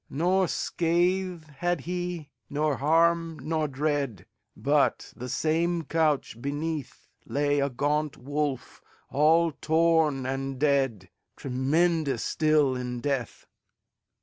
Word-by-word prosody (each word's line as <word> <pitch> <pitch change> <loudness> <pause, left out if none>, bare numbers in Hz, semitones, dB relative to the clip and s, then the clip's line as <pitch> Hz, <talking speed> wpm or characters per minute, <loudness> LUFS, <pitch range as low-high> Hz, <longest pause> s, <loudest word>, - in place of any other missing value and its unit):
Nor 180 +5 +2
scath 175 +1 0
had 175 +3 0
he, 175 -4 -4 0.2
nor 150 0 0
harm, 165 +2 +2
nor 155 -1 -1
dread, 140 - -2 0.3
But, - - +1
the 125 +1 -7
same 165 +4 0
couch 150 -7 0
beneath, 145 +1 -4 0.2
Lay 145 0 +1
a 140 0 +1
gaunt 145 +3 -1
wolf, 145 0 -3 0.3
all 160 +3 +4
torn 160 -3 +2
and 135 0 -3
dead, 135 -10 +1 0.2
Tremendous 140 +1 0
still 155 -4 +2
in 125 -1 -4
death. 130 -3 -3
150 Hz, 105 wpm, -27 LUFS, 135-165 Hz, 0.3 s, all